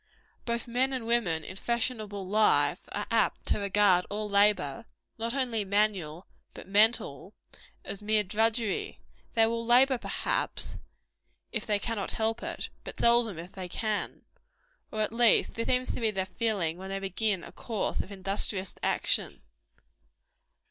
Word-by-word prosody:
Both 235 0 -2
men 255 +3 +1
and 255 -3 -3
women, 210 -9 +1
in 185 - -8
fashionable 215 -4 -2
life, 215 +2 +2
are - - -3
apt - - +1
to - - +2
regard 200 -2 +3
all 210 +1 -2
labor 200 - +2 0.3
not 230 +3 -2
only 245 -5 0
manual, 195 -5 0 0.3
but - - -10
mental 215 +4 +2 0.5
as 200 - -4
mere 215 0 +2
drudgery. 220 +2 0 0.4
They 225 -1 +6
will 230 +1 -1
labor, 250 +2 +4
perhaps, - - -2 0.7
if 220 -3 -3
they 210 -1 +2
cannot 205 -1 -3
help 225 +1 0
it; - - -4
but - - -8
seldom, 235 -5 +3
if 170 +3 -8
they 185 -2 -7
can. 215 +2 -2 0.7
Or 215 - -2
at 215 +1 0
least, 235 -1 +4
this 230 - -3
seems 255 0 +1
to - - -5
be 225 - +3
their 190 -3 -1
feeling 185 -3 -1
when 190 +1 -7
they 195 - -2
begin 195 0 -1
a - - -9
course 225 -3 -2
of 195 - -9
industrious 195 0 -2
action. - - 0
215 Hz, 150 wpm, -29 LUFS, 195-230 Hz, 0.7 s, They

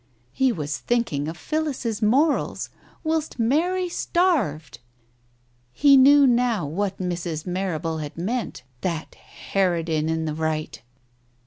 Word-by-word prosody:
He 265 -1 +2
was 150 -7 -3
thinking 230 -12 -1
of 165 +2 -5
Phillis's 270 - -2
morals 275 +8 +1 0.3
whilst 315 -3 -1
Mary 335 +10 +1
starved! 265 - 0 0.9
He 280 - +6
knew 280 +2 +7
now 240 - +2
what 190 +6 -2
Mrs. 175 -3 -3
Marrable 175 -3 -2
had 150 +1 -7
meant. 205 - -3 0.2
That 170 -4 -3 0.4
harridan 165 -5 +1
in 160 0 -1
the 155 - -2
right 155 -4 -3
195 Hz, 115 wpm, -24 LUFS, 160-265 Hz, 0.9 s, knew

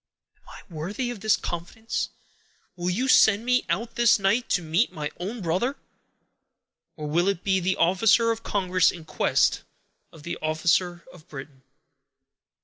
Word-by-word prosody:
"Am - - -38
I 180 - -14
worthy 200 +11 -4
of 240 - -8
this 215 +1 +2
confidence? 175 +7 -4 0.7
Will 175 0 -2
you 235 +9 -1
send 220 -3 +5
me 250 0 +1
out 225 +7 -2
this 235 -1 +4
night, 200 +5 0
to 180 - +1
meet 165 +9 +1
my 150 -1 -5
own 205 +4 -5
brother? 190 - -1 1.2
or 155 - -7
will 170 +5 +1
it 200 -2 -1
be 190 -1 +2
the 190 +1 0
officer 210 +6 +3
of 225 0 -4
Congress 185 -5 +1
in 165 -3 -7
quest - - +1 0.5
of 160 - -15
the 170 - -5
officer 170 +3 0
of 175 -1 -17
Britain?" 135 -1 -10
185 Hz, 155 wpm, -25 LUFS, 165-225 Hz, 1.2 s, send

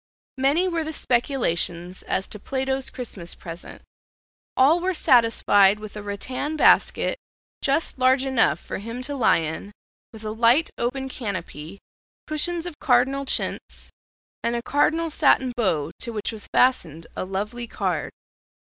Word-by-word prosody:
Many 290 +8 +3
were 335 -3 -1
the 315 +1 -4
speculations 185 - -1
as 190 - -1
to 210 - -7
Plato's 265 +2 -2
Christmas 200 -9 -6
present. 170 0 -9 0.7
All 285 +6 +5
were 370 +1 -1
satisfied 210 -6 +4
with 215 -1 -9
a 210 - -5
rattan 255 +9 -4
basket - - +3 0.4
just 280 0 0
large 260 +1 +4
enough 230 - +2
for - - -6
him 230 +5 -6
to 285 +2 -4
lie 255 - +4
in, 160 +6 -5 0.4
with 220 -1 -12
a 215 - -2
light 235 +8 +3
open 265 +3 -2
canopy, 190 - -6 0.5
cushions 335 +3 -1
of 345 -4 -7
cardinal 270 +2 +2
chintz, - - -2 0.5
and 235 +1 0
a 235 - -3
cardinal 315 +4 +1
satin 265 -4 +3
bow 165 -10 0
to 235 - -2
which 215 -1 -3
was 220 -2 -4
fastened 165 - +2
a - - -3
lovely 210 +6 -4
card. - - -2
245 Hz, 145 wpm, -24 LUFS, 205-275 Hz, 0.7 s, All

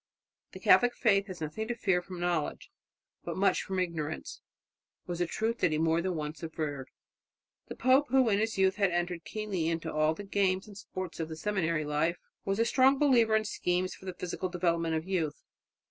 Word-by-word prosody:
"The - - -8
Catholic 245 0 +5
faith 200 -4 +3
has 185 -4 -8
nothing 160 +9 -3
to 240 - -2
fear 190 -6 +1
from 180 0 -9
knowledge, 175 -3 -2 0.5
but - - -4
much 195 +1 +3
from 190 - -4
ignorance," 165 -4 -3 0.6
was 175 -1 -4
a 175 - +1
truth 225 +6 -1
that 165 - +2
he 155 - +1
more 165 +1 +2
than 185 0 -2
once 150 +1 -5
averred. 150 -5 -4 0.8
The - - -7
pope, 265 +3 +4
who 260 -1 +4
in 205 -2 +3
his 220 0 -1
youth 190 0 +3
had 200 -2 +3
entered 175 -1 -2
keenly 205 -6 -2
into 165 -1 -2
all 155 +1 +2
the 205 - -7
games 195 -1 +1
and 205 - -12
sports 185 -3 -7
of 160 -1 -3
the 160 - -5
seminary 165 -5 0
life, 155 +4 0 0.3
was 195 0 0
a 230 - +3
strong 265 +3 +4
believer 240 -6 +4
in 215 0 +2
schemes 180 -3 -1
for - - -14
the 185 -1 -5
physical 180 +1 -4
development 170 -2 0
of 160 +2 -3
youth. 170 -6 -2
180 Hz, 200 wpm, -30 LUFS, 165-210 Hz, 0.8 s, Catholic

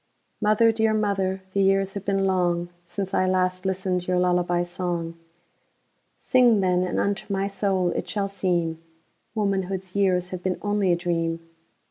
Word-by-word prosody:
Mother, 215 +2 +4
dear 220 -1 +1
mother, 195 -3 0
the 200 - +2
years 195 0 +2
have 200 -1 -6
been 195 -1 +1
longSince 175 +1 -2
I 185 - +2
last 185 0 0
listened 185 -1 -1
your 180 0 +1
lullaby 175 -1 +2
song:Sing, 175 +7 -2
then, 180 -2 +2
and 180 -1 -1
unto 200 +1 -1
my 195 0 0
soul 195 -2 0
it - - -3
shall 200 -2 -1
seemWomanhood's 185 +2 -3
years 185 -2 +1
have 185 -1 -5
been 185 0 -1
only 205 -2 +1
a - - +4
dream. 165 -1 -2
185 Hz, 140 wpm, -24 LUFS, 175-195 Hz, -, Mother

